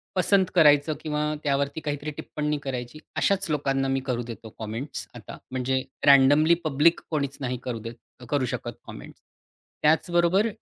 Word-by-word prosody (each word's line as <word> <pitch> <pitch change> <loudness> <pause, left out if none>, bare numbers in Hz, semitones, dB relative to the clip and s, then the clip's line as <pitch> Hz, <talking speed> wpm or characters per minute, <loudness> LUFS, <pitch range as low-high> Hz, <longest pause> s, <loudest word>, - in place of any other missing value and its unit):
पसंत 190 +1 +3
करायचं 150 -1 +5
किंवा 150 -1 -2 0.2
त्यावरती 140 +1 0
काहीतरी 145 0 -4
टिप्पणी 150 0 -3
करायची 130 +2 -5 0.2
अशाच 195 -4 +1
लोकांना 135 -2 0
मी 135 0 +1
करू 120 -2 -1
देतो 115 -1 -9
कमेंट्स 115 +7 -5
आता. - - -10
म्हणजे 130 +1 0 0.3
रँडमली 145 +4 +6
पब्लिक 155 +2 +3
कोणीच 140 -3 -2
नाही 125 -1 -2
करू 120 -3 -4
देत 115 - -7 0.3
करू 145 -3 +1
शकत - - -4 0.2
कमेंट्स. - - -11 0.6
त्याचबरोबर 175 +6 +3
145 Hz, 140 wpm, -25 LUFS, 130-155 Hz, 0.6 s, रँडमली